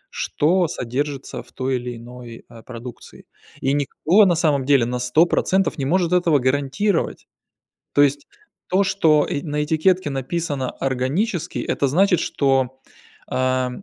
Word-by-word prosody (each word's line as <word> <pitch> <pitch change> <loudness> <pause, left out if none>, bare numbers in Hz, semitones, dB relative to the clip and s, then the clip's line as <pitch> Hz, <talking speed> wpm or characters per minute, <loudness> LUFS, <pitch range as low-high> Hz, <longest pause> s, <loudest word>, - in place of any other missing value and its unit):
что 175 +3 +1
содержится 135 +2 -4
в - - -19
той 130 0 -2
или 120 0 -6
иной, 120 0 -11
а, 115 -2 -14
продукции, 120 0 -11 0.4
и 135 +1 +1
никто 160 +8 +3
на 175 -3 +3
самом 150 -5 +1
деле 140 -4 +4
на 125 +1 -3
100 125 +7 +3
процентов 190 +1 0
не 135 - -1
может 175 +3 +1
этого 175 -4 +3
гарантировать. 140 +8 -1 0.7
То 145 - +4
есть 145 0 +2 0.4
то, 190 +2 +2
что, 160 -6 +3
э, 145 - -2
на 150 -2 -2
этикетке 160 +2 +1
написано 140 0 -3
"органический", 150 - -2
это 140 - 0
значит, 180 +4 +3
что, 135 -2 0 0.5
а, 130 0 0
145 Hz, 145 wpm, -21 LUFS, 130-170 Hz, 0.7 s, деле